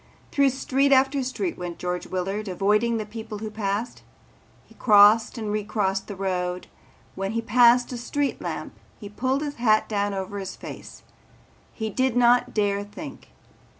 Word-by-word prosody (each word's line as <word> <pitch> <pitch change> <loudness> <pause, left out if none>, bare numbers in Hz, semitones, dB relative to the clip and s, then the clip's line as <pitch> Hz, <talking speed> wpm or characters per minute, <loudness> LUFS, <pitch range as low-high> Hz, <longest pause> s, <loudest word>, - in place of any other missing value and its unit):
Through 280 -1 +4
street 270 +1 +1
after 270 +1 +4
street 295 +8 -3
went 175 -1 -5
George 180 0 -3
Willard, 195 +3 -3
avoiding 210 +5 +1
the 215 - -3
people 220 0 -7
who 215 +1 -6
passed. 210 +2 -3 0.6
He - - -20
crossed 215 +1 +5
and 215 -2 -3
recrossed 205 -2 -1
the 205 - -6
road. 180 -2 -2 0.5
When 195 +2 -3
he 230 - -1
passed 240 +2 +5
a - - -4
street 280 +4 -2
lamp - - -5 0.3
he 205 - -8
pulled 260 +7 -1
his 290 -1 -5
hat 220 -2 +3
down 205 -1 -1
over 195 +1 -4
his 190 -1 -6
face. - - -10 0.7
He 220 -1 -4
did 255 +1 0
not 245 0 +4
dare 205 -1 0
think. 205 +1 -10
215 Hz, 160 wpm, -25 LUFS, 200-245 Hz, 0.7 s, crossed